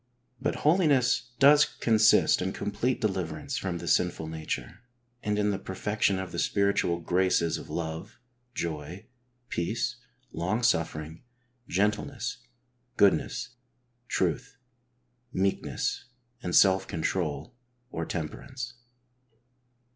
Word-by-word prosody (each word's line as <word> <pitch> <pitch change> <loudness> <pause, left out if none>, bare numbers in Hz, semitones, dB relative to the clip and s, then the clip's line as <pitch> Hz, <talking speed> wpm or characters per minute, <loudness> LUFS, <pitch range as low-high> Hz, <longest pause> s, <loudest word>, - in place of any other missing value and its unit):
But. 145 - 0
holiness 140 -8 +3
does 145 +2 +7
consist 110 -9 +4
in 95 +1 -1
complete 115 +5 -1
deliverance 90 -7 -2
from 90 -3 -2
the 85 - -7
sinful 85 -2 +1
nature, 80 +5 -5 0.4
and 105 0 -1
in 105 0 +2
the 100 - -2
perfection 100 +1 0
of 95 -1 -5
the 85 - -3
spiritual 100 -2 +1
graces 90 -1 +1
of - - -11
love, 85 +6 -5 0.4
joy, 85 +2 -4 0.4
peace, 85 - -1 0.3
long 95 +8 -1
suffering, 80 -6 0 0.5
gentleness, 105 +5 -1 0.6
goodness, 100 +4 +2 0.6
truth, 135 - -1 0.7
meekness 95 +5 -1 0.4
and 90 - -2
self 95 -1 +5
control 80 - -2 0.4
or 85 - -3
temperance. 120 - -5
95 Hz, 100 wpm, -28 LUFS, 85-115 Hz, 0.7 s, does